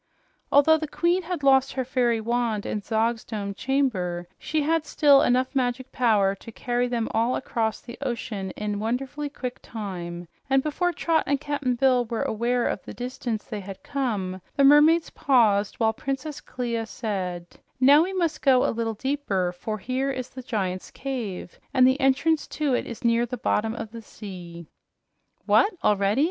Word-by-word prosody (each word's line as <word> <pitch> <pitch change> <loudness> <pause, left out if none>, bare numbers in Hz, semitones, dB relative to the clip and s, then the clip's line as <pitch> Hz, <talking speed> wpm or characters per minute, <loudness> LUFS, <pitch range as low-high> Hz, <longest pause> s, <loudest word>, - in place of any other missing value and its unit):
Although 315 +3 +6
the 310 - -3
queen 345 +5 +1
had 345 -4 -5
lost 270 -1 +4
her 260 -1 -2
fairy 240 -3 +1
wand 230 -2 -1
in 210 - -2
Zog's 225 +2 0
domed 200 -3 -5
chamber, 195 -11 -1
she 310 -1 -1
had 325 +1 +1
still 285 -2 +5
enough 255 +2 +2
magic 255 0 -1
power 210 -6 +3
to 200 +4 -11
carry 245 +2 -1
them 235 -2 -1
all 230 +3 +2
across 220 -2 -2
the 235 - -10
ocean 230 -7 -3
in 210 -1 -2
wonderfully 265 +6 -2
quick 250 -3 -6
time, 175 -5 -6 0.2
and 270 0 +3
before 355 +4 0
Trot 330 -2 +1
and 280 0 +1
Cap'n 285 -3 -1
Bill 250 -1 +3
were 230 -1 -2
aware 240 +2 0
of - - -2
the - - -10
distance 245 -3 -4
they 215 - -5
had 195 +6 -9
come, 210 -11 -2
the 280 - +3
mermaids 300 +4 +6
paused 215 -7 +3
while 220 -1 +1
Princess 275 +5 -4
Clia 235 -3 -3
said: 185 -7 -4 0.3
"Now 280 +4 +7
we 365 +3 0
must 340 -5 -1
go 260 -3 +4
a - - +1
little 225 -1 -2
deeper, 210 -8 -1
for 215 +5 -5
here 255 +6 -2
is 260 -2 -4
the 260 - -9
Giant's 195 -7 -3
Cave 235 -10 -5 0.2
and 255 -1 +6
the 260 +2 +2
entrance 285 +4 +2
to 295 -3 +1
it - - 0
is 235 - -8
near 235 +1 +3
the 250 - -5
bottom 220 0 0
of 225 -2 -6
the 230 0 -8
sea." 175 -5 -9 0.8
"What, 410 - +4
already?" 205 +2 +2
245 Hz, 175 wpm, -25 LUFS, 215-275 Hz, 0.8 s, Now